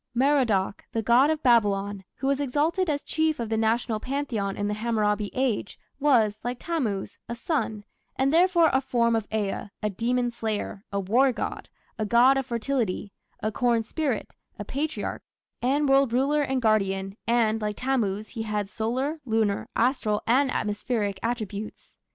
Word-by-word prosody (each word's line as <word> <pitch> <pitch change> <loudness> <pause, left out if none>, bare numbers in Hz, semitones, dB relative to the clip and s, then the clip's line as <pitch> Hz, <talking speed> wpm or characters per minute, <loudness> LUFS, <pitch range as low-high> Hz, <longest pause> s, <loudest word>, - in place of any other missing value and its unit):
Merodach, 245 -8 +2
the 225 - -1
god 245 +6 +5
of 315 -1 -1
Babylon, 205 -5 +2
who 270 - -6
was 275 0 +2
exalted 310 +7 +1
as 290 -1 -1
chief 315 -2 0
of 230 -2 -3
the 225 - 0
National 225 0 +1
pantheon 240 -7 -2
in 205 - -1
the 210 - -1
Hammurabi 210 -2 0
Age, 255 -6 -1 0.2
was, 230 -8 +3
like 245 +1 -3
Tammuz, 245 - -3
a 235 - -3
son, 230 -5 -2 0.3
and 270 +2 +1
therefore 345 -1 +5
a 265 - +3
form 235 -3 +1
of 225 -2 -1
Ea, 210 -1 -2
a 210 - +1
demon 245 +2 0
slayer, 215 -3 -3
a 200 - -1
war 240 +8 +3
god, 245 - -5 0.3
a 215 - 0
god 245 +5 +6
of 270 -1 -2
fertility, 230 -5 -2 0.3
a 215 - 0
corn 235 0 +1
spirit, 265 0 -2 0.2
a 205 - -6
Patriarch, 295 +7 -3 0.4
and 280 +4 +2
world 270 -3 +4
ruler 280 +4 +2
and 265 -3 -1
guardian, 195 -3 +1
and, 225 -2 +2
like 210 -1 -2
Tammuz, 215 -6 -1
he 225 - -5
had 210 -2 -2
solar, 260 +8 -2
lunar, 220 -4 0
astral, 230 -4 +1
and 265 +4 +3
atmospheric 210 -3 -1
attributes. 215 -3 -4
235 Hz, 165 wpm, -26 LUFS, 210-270 Hz, 0.4 s, god